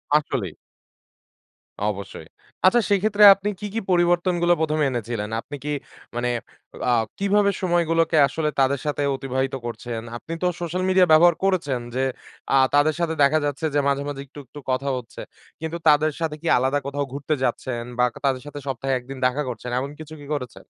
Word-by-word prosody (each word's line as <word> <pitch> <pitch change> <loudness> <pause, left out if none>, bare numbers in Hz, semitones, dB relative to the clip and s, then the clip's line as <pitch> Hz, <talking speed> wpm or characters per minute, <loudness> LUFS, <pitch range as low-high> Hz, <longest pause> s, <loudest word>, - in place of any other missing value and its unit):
আসলেই। 115 - 0 1.3
অবশ্যই। 100 -2 -5 0.4
আচ্ছা, 235 +6 +6
সেক্ষেত্রে 205 +1 +3
আপনি 200 +1 -4
কি, 210 - -6
কি 225 - 0
পরিবর্তনগুলা 175 0 +3
১ম 155 -1 0
এ - - +3
এনেছিলেন? 115 -4 -3
আপনি 145 - -8
কি 150 - -4 0.5
মানে 120 0 0 0.6
আ - - +4 0.3
কিভাবে 200 +1 +3
সময়গুলোকে 165 -2 +2
আসলে 155 -1 -1
তাদের 135 +1 +2
সাথে 145 -1 -1
অতিবাহিত 135 0 -2
করছেন? 120 -1 -5 0.2
আপনি 165 - -8
তো - - +3
সোশ্যাল 175 +2 -2
মিডিয়া 185 -1 +5
ব্যবহার 170 +2 +7
করেছেন? 165 -9 +1 0.2
যে 130 - 0 0.5
আ - - +6 0.2
তাদের 145 +1 +4
সাথে 170 -1 0
দেখা 155 +3 +4
যাচ্ছে 145 +2 -2
যে - - +4
মাঝে, 140 0 +1
মাঝে 145 -1 -5
একটু, 140 +2 -13
একটু 145 - -11
কথা 135 +2 -1
হচ্ছে। 120 -2 -9 0.4
কিন্তু 160 +1 -3
তাদের 155 +1 +5
সাথে 160 -2 -2
কি 170 - -5
আলাদা 130 +3 +1
কোথাও 145 0 -2
ঘুরতে 145 +2 -2
যাচ্ছেন 120 -1 -2
বা, 125 - +3
কা - - -11
তাদের 130 -2 +1
সাথে 145 0 -7
সপ্তাহে 135 +1 -2
১ 125 - -9
দিন 135 - -6
দেখা 130 +3 +1
করছেন, 125 +1 -6
এমন 140 +2 -4
কিছু 155 0 -9
কি - - -10
করেছে? 125 -5 -6
145 Hz, 180 wpm, -23 LUFS, 130-170 Hz, 1.3 s, ব্যবহার